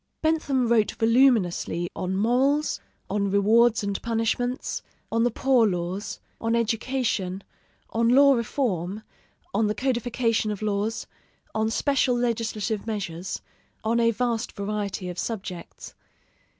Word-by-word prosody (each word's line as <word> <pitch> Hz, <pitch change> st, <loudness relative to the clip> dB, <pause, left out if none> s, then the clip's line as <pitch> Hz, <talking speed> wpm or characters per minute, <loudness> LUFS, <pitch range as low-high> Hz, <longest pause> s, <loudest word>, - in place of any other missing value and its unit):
Bentham 290 Hz, -6 st, +1 dB
wrote 225 Hz, -2 st, +3 dB
voluminously 225 Hz, -8 st, +2 dB
on 185 Hz, +1 st, -2 dB
morals, 260 Hz, +8 st, +2 dB, 0.3 s
on 200 Hz, 0 st, 0 dB
rewards 220 Hz, +3 st, +4 dB
and 200 Hz, -1 st, -2 dB
punishments, 235 Hz, +3 st, -1 dB, 0.3 s
on 230 Hz, +1 st, +2 dB
the 240 Hz, -, +3 dB
poor 245 Hz, -1 st, +3 dB
laws, 180 Hz, +2 st, -3 dB, 0.2 s
on 230 Hz, +1 st, 0 dB
education, 225 Hz, -5 st, -1 dB, 0.5 s
on 230 Hz, +1 st, +2 dB
law 280 Hz, +3 st, +7 dB
reform, 215 Hz, -, -1 dB, 0.5 s
on 220 Hz, -, +2 dB
the 210 Hz, -, -1 dB
codification 240 Hz, -2 st, 0 dB
of 210 Hz, 0 st, -4 dB
laws, 210 Hz, +2 st, -1 dB, 0.5 s
on 220 Hz, 0 st, +1 dB
special 255 Hz, 0 st, +2 dB
legislative 225 Hz, -3 st, -1 dB
measures, 190 Hz, -4 st, -4 dB, 0.4 s
on 230 Hz, +2 st, +1 dB
a 230 Hz, 0 st, +4 dB
vast 230 Hz, 0 st, -1 dB
variety 200 Hz, -2 st, -3 dB
of 180 Hz, 0 st, -5 dB
subjects. 190 Hz, -6 st, -6 dB
225 Hz, 120 wpm, -25 LUFS, 200-240 Hz, 0.5 s, law